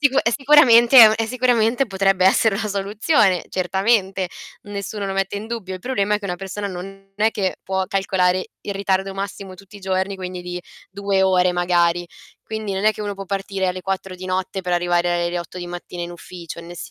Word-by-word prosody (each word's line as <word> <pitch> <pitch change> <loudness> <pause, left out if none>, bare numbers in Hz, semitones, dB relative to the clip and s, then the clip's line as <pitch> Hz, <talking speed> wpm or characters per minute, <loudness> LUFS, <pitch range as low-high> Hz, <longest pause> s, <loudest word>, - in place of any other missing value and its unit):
sicu 280 -2 +3
è 235 - +2
sicuramente 260 -3 +6
è 225 - +12
un 215 - +3
è 225 0 -1
sicuramente 245 +1 +2
potrebbe 195 -1 +2
essere 195 +1 +3
una 215 0 -2
soluzione, 200 - +1
certamente, 190 0 0 0.3
nessuno 200 0 -5
lo 195 - -3
mette 195 +1 -1
in 210 - -6
dubbio. 225 -5 -5
Il 185 - -8
problema 210 -4 0
è 210 - +1
che 205 - -13
una 180 -1 -3
persona 195 +2 -5
non 195 +2 -9
è 215 +2 +3
che 195 -5 -2
può 190 0 -2
calcolare 185 -1 0
il 200 - -5
ritardo 195 0 -1
massimo 195 -1 -6
tutti 195 +2 -15
i - - -13
giorni 190 +1 -1
quindi 180 -1 -6
di 180 0 -5 0.3
2 200 0 0
ore 185 -1 +3
magari. 175 -1 +1 0.4
Quindi 220 -2 -5
non 190 +2 -2
è 215 - +5
che 215 - -10
uno 205 -1 -3
può 195 0 -7
partire 195 -1 -2
alle 185 0 -3
4 190 -1 -3
di 185 +1 -8
notte 185 +1 -2
per 180 -1 -3
arrivare 175 0 +1
alle 175 +1 -2
8 175 +1 -8
di 175 - -6
mattina 175 0 -7
in 170 - -5
ufficio, 170 -1 -9
nel 170 +1 -11
195 Hz, 210 wpm, -21 LUFS, 180-210 Hz, 0.4 s, è